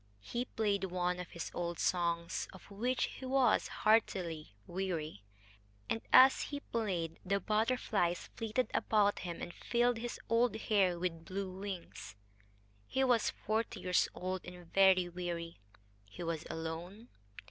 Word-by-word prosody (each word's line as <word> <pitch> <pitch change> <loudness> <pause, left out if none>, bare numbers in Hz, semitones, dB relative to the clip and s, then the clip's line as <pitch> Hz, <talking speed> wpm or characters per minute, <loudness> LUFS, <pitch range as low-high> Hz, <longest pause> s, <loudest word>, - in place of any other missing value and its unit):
He 240 +1 -2
played 205 -5 0
one 180 -1 -1
of 180 - -6
his 170 - -6
old 170 -1 -2
songs, 170 -1 0
of 190 +1 -14
which 245 +5 0
he - - -4
was 265 -1 +3
heartily 180 - +1
weary, 170 - -3 0.7
and, 225 - 0
as 260 +1 +8
he 285 - -4
played, 180 - -2
the 200 +1 +1
butterflies 215 -5 0
flitted 225 +3 -1
about 205 -2 +3
him 175 -2 -5
and 175 - -6
filled 240 0 +1
his 240 +1 -5
old 230 0 +3
hair 200 -5 +2
with 170 -2 -3
blue 190 +1 -4
wings. 190 - -7 0.7
He 265 - +1
was 245 -4 +3
forty 220 +1 -2
years 180 -1 +2
old 185 0 -3
and 180 -2 -11
very 190 -2 +6
weary. 170 - -5 0.5
He 100 +11 -8
was 165 -1 -3
alone. 170 +8 -6
185 Hz, 140 wpm, -34 LUFS, 175-220 Hz, 0.7 s, as